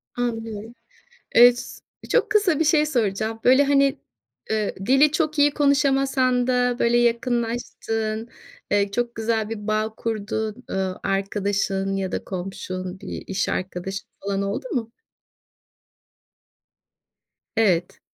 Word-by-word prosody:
Anlıyorum. 225 -2 -4 0.6
Eee, 245 +1 +9
s 245 - -8 0.3
çok - - +2
kısa 405 -8 +3
bir - - +4
şey 300 -1 +4
soracağım. 225 -4 -1
Böyle, 260 +3 +6
hani, 275 -1 +3 0.5
eee, 215 -1 -1
dili 275 +4 +5
çok 310 -1 0
iyi 290 0 +5
konuşamasan 270 -3 +2
da 245 -1 +1
böyle 235 +1 +3
yakınlaştığın, 230 -2 -1 0.4
eee, 200 -1 +2
çok 240 +2 -2
güzel 220 -1 -1
bir 210 -1 -6
bağ 215 +1 0
kurduğun, 220 -1 -3
eee, - - -3 0.3
arkadaşın 195 0 -1
ya 190 -1 -2
da - - -3
komşun, 185 0 -5
bir - - -7
iş 195 0 -1
arkadaşın 190 +2 -4
falan, 200 0 -2
oldu 200 - -3
mu? 230 -3 -2 2.7
Evet. 180 -6 +2
225 Hz, 120 wpm, -23 LUFS, 200-255 Hz, 2.7 s, Eee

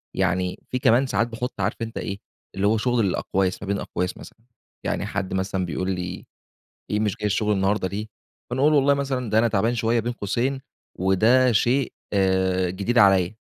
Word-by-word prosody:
يعني 90 -1 0
في 125 - -1
كمان 120 +3 +4
ساعات 115 0 +1
باحط 115 -2 -5
عارف 100 +3 0
أنت 115 0 -4
إيه 100 - -4 0.4
اللي 95 +1 +1
هو 110 +2 +3
شغل 120 0 +1
الأقواس 95 0 -1
ما - - -6
بين 100 0 0
أقواس 90 0 -3
مثلًا، - - -13 0.5
يعني - - -1
حد 100 -2 -3
مثلًا 95 -1 -1
بيقول 95 +2 -2
لي 90 0 -5 0.7
ايه 105 - +1
مش 105 -3 0
جاي 105 - -4
الشغل 105 +1 0
النهاردة 95 0 +1
ليه 105 +3 -5 0.4
فانا 130 +2 -1
أقول 150 +2 +5
له - - +5
والله 140 0 +4
مثلًا 135 -4 -2
ده 110 +1 +3
أنا 115 - +3
تعبان 115 +2 +1
شوية 115 +1 +1
بين 120 +2 -2
قوسين 120 +6 -2 0.4
وده 110 +7 +4
شيء 120 +4 +1 0.7
جديد 100 +7 -2
عليّا، 95 -2 +5
105 Hz, 185 wpm, -24 LUFS, 95-120 Hz, 0.7 s, أقول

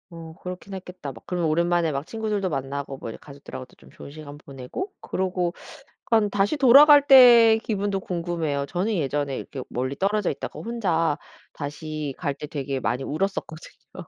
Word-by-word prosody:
어 165 -1 -10
그렇긴 180 +2 -7
했겠다. 180 -5 -8
막 115 - -14
그러면 175 -3 -1
오랜만에 170 0 +1
막 140 +1 -3
친구들도 215 -2 -2
만나고 140 -1 -4
뭐 - - -6
이제 - - -8
가족들하고도 140 -2 -11
좀 - - -18
좋은 - - -12
시간 145 -1 -10
보내고 140 - -7
그러고 185 -2 -2 0.5
그럼 220 -3 +2
다시 205 +9 +1
돌아갈 285 +2 +8
때의 240 -5 +8
기분도 205 -3 -2
궁금해요. 170 -6 -2
저는 185 +8 -2
예전에 145 -3 -1
이렇게 135 - -7
멀리 130 +3 -3
떨어져 200 +2 0
있다가 140 - -7
혼자 170 -10 0 0.4
다시 150 -1 -5
갈 145 -5 -2
때 145 +2 -8
되게 140 -3 -4
많이 130 +1 -2
울었었거든요. 160 -1 -5
170 Hz, 390 characters per minute, -24 LUFS, 145-200 Hz, 0.5 s, 돌아갈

